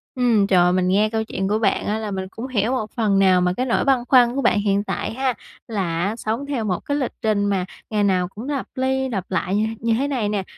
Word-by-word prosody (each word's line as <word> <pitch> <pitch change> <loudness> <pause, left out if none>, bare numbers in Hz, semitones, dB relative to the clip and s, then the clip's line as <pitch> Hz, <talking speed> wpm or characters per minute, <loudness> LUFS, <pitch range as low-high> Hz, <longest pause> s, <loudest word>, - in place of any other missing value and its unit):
Ừm, 235 -5 +3
trời, 180 -2 +4
mình 185 0 +1
nghe 205 +3 +3
câu 220 0 -1
chuyện 190 -3 -3
của 210 +2 +1
bạn 200 -3 +1
á 210 - -1
là 215 -2 -4
mình 190 -1 -4
cũng 240 +3 -6
hiểu 230 -2 0
một 220 -5 -2
phần 210 -4 +2
nào 185 -2 +4
mà 180 0 +1
cái 255 - 0
nỗi 240 - +1
băn 270 -2 +4
khoăn 245 -2 +5
của 275 - 0
bạn 210 - +3
hiện 200 -1 +1
tại - - -3
ha, 260 +1 0 0.3
là 185 -7 -2
á, 205 +3 -1
sống 230 +4 -3
theo 275 -5 -2
một 180 -3 -1
cái 285 - -1
lịch 265 -4 -1
trình 210 -2 +1
mà 195 -3 0 0.2
ngày 210 -2 0
nào 185 -2 +2
cũng 220 +8 -8
lặp 280 -3 -2
ly 265 0 0
lặp 190 -5 -4
lại 185 +1 0
như 215 +1 +2
th - - -31
như 230 0 +2
thế 265 +5 0
này 245 -7 -1
nè, 205 -2 -1
215 Hz, 270 wpm, -22 LUFS, 195-250 Hz, 0.3 s, khoăn